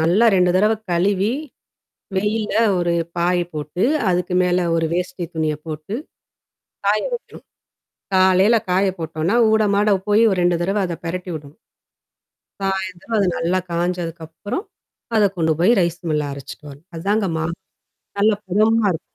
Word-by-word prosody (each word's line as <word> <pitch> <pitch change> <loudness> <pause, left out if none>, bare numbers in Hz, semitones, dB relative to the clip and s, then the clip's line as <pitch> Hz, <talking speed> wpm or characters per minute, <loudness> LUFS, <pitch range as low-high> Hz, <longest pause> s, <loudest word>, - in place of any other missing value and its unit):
நல்லா 180 +9 +4
2 180 -1 +4
தடவ 210 +3 +4 0.2
கழுவி. 190 +4 +2 0.9
வெயில 210 +2 0 0.3
ஒரு 175 -1 +1 0.2
பாய் 175 +1 +2
போட்டு, 150 +4 -3 0.3
அதுக்கு 180 0 0
மேல 180 -1 +1
ஒரு 165 0 +1
வேஷ்டி 180 0 -2
துணிய 155 -2 0
போட்டு, 155 +5 -5 0.9
காய 210 +1 +3
வைக்கணும். 480 - -8 0.7
காலையில 190 +4 +5 0.2
காய 190 +2 +3
போட்டோம்னா, 160 +4 -1 0.2
ஊட, 220 0 +4
மாட 205 -1 +3
போய் 210 +2 +5 0.2
2 175 -1 +3
தடவை 195 +4 0
அத 170 - -3
பிரட்டி 180 +2 -4
விடணும். 145 0 -10 1.0
சாயந்தரம் 190 +2 -3
அது 200 - +3
நல்லா 175 +3 0
காஞ்சதுக்கப்புறம். 170 - -3 0.5
அத 215 - +5
கொண்டு 160 -2 +2
போய் 180 +7 +4
ரைஸ் 170 -1 -1
மில்லுல 150 -2 0
அரைச்சுட்டு 140 +2 -10
வரணும். 145 +6 -15
அதாங்க 200 +5 0
மாவு 160 +1 -2 0.6
நல்ல 215 +2 +4 0.2
பதமா 215 +4 +3
இருக்கும். 160 - -4
180 Hz, 135 wpm, -20 LUFS, 165-200 Hz, 1.0 s, காலையில